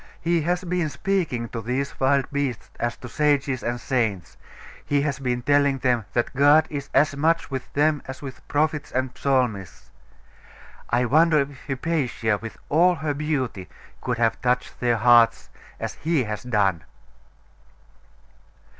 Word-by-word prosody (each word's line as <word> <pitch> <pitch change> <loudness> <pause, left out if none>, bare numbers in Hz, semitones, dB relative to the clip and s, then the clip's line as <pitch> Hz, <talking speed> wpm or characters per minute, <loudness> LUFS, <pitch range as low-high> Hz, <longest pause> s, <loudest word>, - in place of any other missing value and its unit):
He 170 0 +1
has 175 +4 -1
been 175 -3 -1
speaking 150 -6 -1
to 115 - -5
these 130 +5 -3
wild 135 0 +3
beasts 140 -4 -3
as 120 0 -2
to 125 - -9
sages 140 -1 +1
and 120 +1 -2
saints; 110 - -2 0.5
he 145 -1 +1
has 140 -2 -2
been 125 -2 -2
telling 145 0 +3
them 125 -4 0
that 120 +2 -1
God 145 +3 +5
is 140 -2 -5
as 150 -1 +3
much 165 +2 +1
with 130 -1 -5
them 150 0 +2
as 130 0 -7
with 135 -2 -9
prophets 150 0 0
and 130 0 -1
psalmists.... 125 -9 -1 1.0
I 120 +2 +2
wonder 155 +5 +4
if 140 0 -7
Hypatia, 130 -7 -1
with 115 -1 -8
all 175 +4 +4
her 155 -2 -2
beauty, 140 -10 -3 0.3
could 125 -2 -2
have 115 -1 +1
touched 125 0 -1
their 120 -1 +1
hearts 120 +1 +4 0.3
as - - -4
he 160 -3 0
has 105 -2 -4
done? 100 -9 0
135 Hz, 150 wpm, -24 LUFS, 120-150 Hz, 1.0 s, God